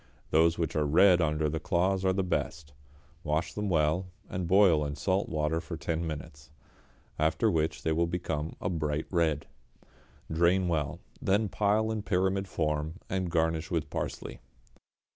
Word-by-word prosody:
Those 80 +1 +4
which 85 -2 -2
are 75 - +2
red 90 +3 +5
under 75 -1 +1
the 80 +2 -2
claws 95 +3 +1
are 95 - +3
the 95 +1 0
best. 75 -4 -3 0.5
Wash 75 +2 -1
them 105 -1 -2
well, 80 +2 +1 0.2
and 90 -1 -3
boil 90 -5 +5
in 70 0 -3
salt 95 +7 0
water 80 +1 0
for 80 - -6
ten 80 +1 -2
minutes, 70 -2 -7 0.7
after 80 +1 +2
which 80 -1 -1
they 80 - +1
will 85 +2 +2
become 80 -3 -3
a - - -3
bright 75 -4 -1
red. 80 -5 +1 0.9
Drain 85 +3 +3
well, 75 -4 -1 0.2
then 100 +2 +2
pile 105 +2 +1
in 110 -1 -2
pyramid 95 0 0
form, 75 -2 -1 0.2
and 95 -1 -1
garnish 80 -1 0
with 80 -3 -2
parsley. - - -4
85 Hz, 160 wpm, -29 LUFS, 75-95 Hz, 0.9 s, red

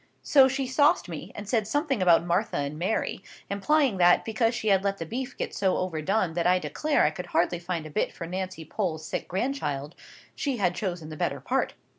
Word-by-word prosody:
So 270 -3 +6
she 270 +1 -1
sauced 260 - +3
me, 170 +3 -7
and 205 - -7
said 215 -1 +1
something 280 - 0
about 170 -2 +5
Martha 175 +5 0
and 145 +2 -3
Mary, 190 +1 -1 0.3
implying 260 +3 +2
that, 175 -1 +5
because 225 +1 +1
she 220 - -1
had 195 -1 +4
let 200 0 0
the 165 - -5
beef 250 - -5
get - - -3
so 190 -2 +1
overdone 185 +1 0
that 170 +1 +1
I 180 +1 +5
declare 300 +10 0
I 150 - +3
could 180 +3 -7
hardly 175 0 +1
find 175 -2 -4
a 155 - -8
bit - - 0
for 170 - -7
Nancy 185 -1 -5
Pole's 160 -3 -3
sick - - -4
grandchild, 175 - -2 0.4
she 275 -4 -2
had 185 -4 +1
chosen 175 -6 -4
the 155 - -8
better - - -1
part. - - -1
185 Hz, 210 wpm, -27 LUFS, 170-230 Hz, 0.4 s, So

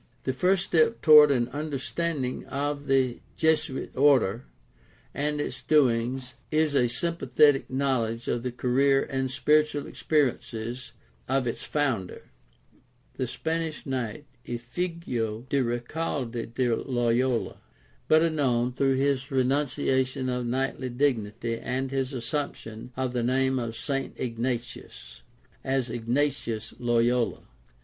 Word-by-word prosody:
— - - -38
The 130 - -1
first 180 +7 +2
step 135 -8 +2
toward 150 -1 +9
an 120 -4 +2
understanding 145 -1 -3
of 145 +1 -3
the 130 -3 +2 0.2
Jesuit 160 -3 0
order 130 -5 +3 0.7
and 150 +1 -1
its 130 -3 -3
doings 130 -2 +2 0.2
is 155 -1 +2
a 130 -3 +4
s>Tnpathetic 140 0 +2
knowledge 125 -4 -1
of 120 - 0
the 125 +1 -3
career 135 +3 +2
and 130 -1 -2
spirit 150 +4 +3
ual 145 -1 -5
experiences 125 -4 -2 0.4
otits 125 -4 0
founder, 130 -11 -2 0.9
the 130 - -1
Spanish 160 +4 -3
knight 130 0 -3 0.2
Ifiigo 120 -3 -3
de 140 +1 +2
Recalde 120 -1 -3
de 120 -1 +1
Loyola, 120 -1 0 0.5
better 160 +1 +4
known, 125 -5 +1
through 135 +1 +2
his 135 0 0
renunciation 130 -1 0
of 125 -1 -2
knightly 130 +1 -1
dignity 115 -3 -1
and 130 +1 -3
his 135 -1 -1
assumption 120 -3 -5
of 130 -1 -1
the 120 - 0
name 130 +2 +1
of 115 -1 -4
St. 135 +1 -3
Ignatius, 115 - -5 0.4
as 130 -3 -1
Ignatius 120 -1 -1
Loyola. 120 0 +1
130 Hz, 120 wpm, -27 LUFS, 120-145 Hz, 0.9 s, toward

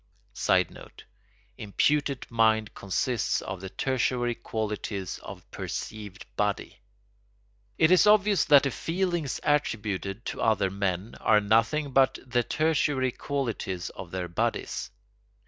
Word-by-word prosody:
[Sidenote: - - -1 0.6
Imputed 140 +6 +1
mind 110 -2 +2
consists 110 +5 -1
of 95 -1 -6
the 95 - -6
tertiary 125 0 0
qualities 105 -5 -4
of - - -10
perceived 105 -3 -6
body.] - - -2 1.0
It 160 +1 +4
is 185 +2 +6
obvious 210 -1 +5
that 145 -2 +7
the 140 - 0
feelings 175 -4 -2
attributed 110 -8 -1
to - - -4
other 105 -4 +2
men 100 +1 -2
are 105 -1 +5
nothing 115 +8 +2
but 135 0 +4
the 125 -1 +1
tertiary 145 -2 +1
qualities 115 -11 -3
of 95 - -9
their 90 0 -3
bodies. 85 - -2
115 Hz, 115 wpm, -27 LUFS, 100-145 Hz, 1.0 s, that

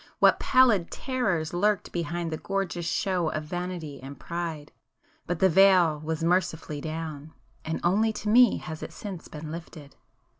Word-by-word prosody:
—what - - +5
pallid 235 -9 +4
terrors 190 - -2
lurked 205 +3 +1
behind 170 0 -3
the 155 - -2
gorgeous 185 -3 -3
show 180 -4 0
of 155 - -3
vanity 170 -4 -5
and 135 0 -9
pride! 165 -4 -5 0.6
But 175 - -1
the 190 - +4
veil 180 -4 +5
was 160 +1 -3
mercifully 165 -4 0
down,—and 160 0 -6
only 210 +6 +3
to 210 0 -6
me 240 +3 +6
has 155 0 -7
it - - -7
since 195 -5 -7
been 155 0 -8
lifted! 160 -3 -9
170 Hz, 150 wpm, -27 LUFS, 155-190 Hz, 0.6 s, me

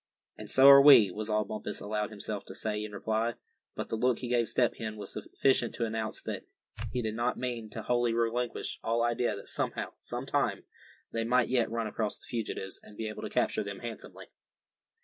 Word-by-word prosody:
"And - - -9
so 135 +1 +6
are 140 0 +11
we," 135 -9 +8
was 105 +3 -5
all 105 0 +1
Bumpus 105 +1 -5
allowed 105 0 -2
himself 105 -1 -5
to 95 - -9
say 105 0 -2
in 105 - -6
reply; 110 +3 -1 0.4
but - - -4
the - - -1
look 125 +1 +2
he 125 - -5
gave 120 -2 +2
Step 120 -2 +2
Hen 110 -1 -4
was 100 -2 -7
sufficient 120 +2 0
to 115 - 0
announce 110 -1 -3
that - - -5 0.4
he 125 - -2
did 110 -1 -2
not 120 +2 -1
mean 120 -3 -4
to 110 +1 -7
wholly 120 0 +2
relinquish 115 +1 -1
all 115 +1 +1
idea 120 -1 +1
that 100 - -10
somehow, - - -2
some - - -5
time, - - 0 0.5
they 115 - -1
might 125 +1 +2
yet 125 -3 +2
run 115 0 -2
across 110 0 -2
the - - -19
fugitives, 105 -4 -4
and 105 - -15
be 110 -1 -3
able 110 - -7
to - - -4
capture - - +1
them - - -7
handsomely. - - -8
115 Hz, 210 wpm, -30 LUFS, 105-120 Hz, 0.5 s, are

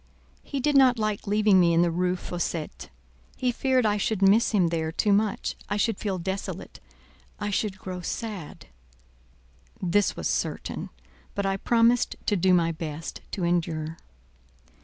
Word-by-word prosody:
"He 280 - -4
did 295 +2 +1
not 260 -3 +6
like 215 -2 -2
leaving 210 -1 +4
me 170 -2 +4
in 170 - +5
the 170 - +1
Rue 180 +2 0
Fossette; 175 -3 -4 0.5
he 250 -1 +1
feared 260 0 +1
I 210 -1 +2
should 205 -1 0
miss 205 +4 +5
him 185 -6 +2
there 160 -1 -1
too 205 +4 +2
much—I 205 0 -1
should 215 0 0
feel 195 -3 -2
desolate—I 195 +2 -7
should 200 -1 -1
grow 185 -2 -6
sad—?" 200 -3 -6 1.1
This 190 +2 +1
was - - -2
certain; - - -3 0.5
but 200 - -1
I 195 0 +1
promised 235 +4 +3
to 205 - +2
do 185 0 +3
my 170 -2 +3
best 160 0 -6
to 190 - -2
endure. 165 -2 -1
195 Hz, 150 wpm, -26 LUFS, 175-215 Hz, 1.1 s, not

